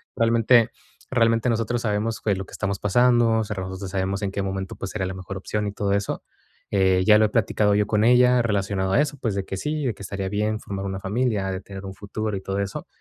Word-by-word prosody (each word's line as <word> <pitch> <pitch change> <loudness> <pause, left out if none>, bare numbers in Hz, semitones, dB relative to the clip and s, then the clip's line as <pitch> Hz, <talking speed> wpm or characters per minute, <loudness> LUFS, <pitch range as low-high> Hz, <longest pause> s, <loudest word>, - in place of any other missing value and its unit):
Realmente 115 0 +4 0.4
realmente 115 -1 +3
nosotros 115 +1 0
sabemos 110 +1 -1
que 105 - 0
es 95 - +1
lo 95 - -5
que - - -17
estamos 100 -1 -2
pasando, 120 +1 +3
o - - +1
sea, 105 - -4
nosotros 95 0 -5
sabemos 95 +1 -1
en 95 - -1
qué 100 - -2
momento, 95 -1 -4
pues, 95 - -6
sería 95 -3 -2
la 95 - -4
mejor 95 +1 -7
opción 105 +2 -2
y - - -2
todo 100 -1 -1
eso. 100 0 -2 0.5
Eh, 95 -2 +3
ya 105 -1 +7
lo 110 - +5
he - - 0
platicado 105 -2 +2
yo 105 0 +2
con 105 0 +2
ella 125 +1 +5
relacionado 100 -3 0
a 120 - +5
eso, 150 -1 -2
pues, 110 -5 -1
de 95 -1 -2
que 95 - -5
sí, 150 +5 -2
de 120 - 0
que - - -14
estaría 95 0 -4
bien 105 +2 -1
formar 100 -2 -5
una 95 0 -3
familia, 100 -1 -1
de 95 - -4
tener 95 0 -9
un 95 - -6
futuro 105 +1 -4
y - - -6
todo 95 +1 -3
eso. 100 0 -4
100 Hz, 250 wpm, -24 LUFS, 95-115 Hz, 0.5 s, ya